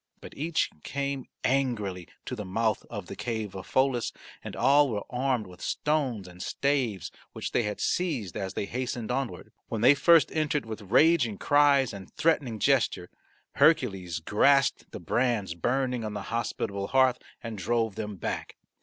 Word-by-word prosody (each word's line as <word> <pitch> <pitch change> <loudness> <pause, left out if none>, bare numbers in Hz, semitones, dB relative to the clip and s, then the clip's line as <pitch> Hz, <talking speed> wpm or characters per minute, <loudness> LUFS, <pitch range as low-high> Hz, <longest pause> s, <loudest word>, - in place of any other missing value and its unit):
But - - -11
each 160 +3 0
came 140 -1 -3 0.2
angrily 105 -10 0 0.2
to 125 - -4
the 105 - -5
mouth 110 +4 -1
of 100 -5 -6
the - - -8
cave 110 -4 -4
of 95 -1 -8
Pholus 130 -3 +1 0.3
and - - -7
all 140 +1 +4
were 105 -3 -2
armed 125 -3 0
with 90 -1 -14
stones 135 -10 -1
and 90 0 -12
staves 130 - -1 0.2
which - - -5
they - - +2
had 105 -2 -3
seized 135 - -1
as 95 -1 -4
they - - -1
hastened 120 0 -3
onward. 135 0 -3 0.2
When 110 - -3
they 125 +4 +7
first 165 +3 +5
entered 150 -4 0
with 110 -1 -6
raging 130 -4 +4
cries 140 -2 +4
and 95 -2 -9
threatening 145 -8 +1
gesture 115 -8 +1 0.4
Hercules 95 - +2
grasped 140 - +3
the - - -7
brands 120 -8 0
burning 125 +6 -1
on 105 -1 -4
the 100 - -4
hospitable 100 -4 -2
hearth 130 -2 +3 0.2
and 115 -1 -5
drove 110 +2 0
them 105 0 -5
back. 90 - -4
120 Hz, 165 wpm, -28 LUFS, 105-135 Hz, 0.4 s, they